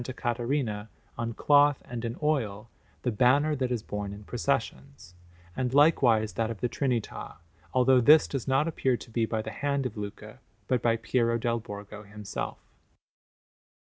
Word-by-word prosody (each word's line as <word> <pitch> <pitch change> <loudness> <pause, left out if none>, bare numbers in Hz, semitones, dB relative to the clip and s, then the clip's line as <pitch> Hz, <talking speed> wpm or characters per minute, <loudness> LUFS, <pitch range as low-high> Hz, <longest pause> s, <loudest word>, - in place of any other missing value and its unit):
Caterina, 120 -3 -2 0.3
on 115 0 -3
cloth 145 -1 +4
and 120 -1 -6
in 115 +1 -4
oil, 115 -8 -1 0.3
the 125 - +1
banner 140 +7 +3
that 130 -2 -2
is 120 -4 -2
borne 105 -1 -5
in 105 +1 -10
processions, 120 -2 -3 0.4
and 130 0 -1
likewise 120 -8 +4
that 115 -1 -1
of 115 -3 -5
the 125 - 0
Trinità, 125 -3 -3 0.4
although 130 0 +4
this 150 +5 +7
does 135 -5 -4
not 135 +4 +2
appear 135 -6 0
to 115 - -13
be 115 0 0
by 110 -1 -2
the - - -6
hand 140 -1 -1
of 115 -3 -4
Luca, 105 +3 -8 0.3
but 125 -3 +1
by 115 -1 +2
Piero 115 0 +1
dal 115 0 -1
Borgo 105 -1 -9
himself. 105 -1 -6
120 Hz, 160 wpm, -28 LUFS, 110-135 Hz, 0.4 s, this